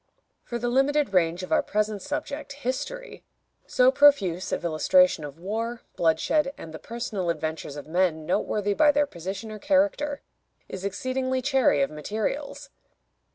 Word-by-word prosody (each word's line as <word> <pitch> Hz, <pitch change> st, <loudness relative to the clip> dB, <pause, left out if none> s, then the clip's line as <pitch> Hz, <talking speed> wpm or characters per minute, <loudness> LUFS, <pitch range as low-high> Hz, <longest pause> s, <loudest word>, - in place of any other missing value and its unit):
For 240 Hz, -, -4 dB
the 240 Hz, +1 st, -2 dB
limited 270 Hz, 0 st, +2 dB
range 175 Hz, 0 st, +2 dB
of 185 Hz, -, -8 dB
our -, -, +4 dB
present 210 Hz, -1 st, -1 dB
subject, 290 Hz, 0 st, -5 dB
history, 285 Hz, -, -5 dB, 0.4 s
so 255 Hz, +1 st, +4 dB
profuse 240 Hz, -12 st, +4 dB
of -, -, -2 dB
illustration 170 Hz, -, +3 dB
of 145 Hz, 0 st, -8 dB
war, 225 Hz, +6 st, -4 dB
bloodshed, 270 Hz, -, +2 dB
and 160 Hz, -, -9 dB
the 160 Hz, -, -7 dB
personal 220 Hz, -6 st, -4 dB
adventures 160 Hz, -3 st, -3 dB
of 145 Hz, -, -7 dB
men 160 Hz, -1 st, 0 dB
noteworthy 205 Hz, +4 st, 0 dB
by 295 Hz, +7 st, +5 dB
their 290 Hz, 0 st, +2 dB
position 195 Hz, -, -6 dB
or 215 Hz, -, -7 dB
character, 290 Hz, 0 st, +1 dB, 0.4 s
is 190 Hz, -, -7 dB
exceedingly 255 Hz, +6 st, -1 dB
chary 260 Hz, -, +3 dB
of 135 Hz, -, -2 dB
materials. 215 Hz, -, -4 dB
220 Hz, 150 wpm, -26 LUFS, 175-280 Hz, 0.4 s, by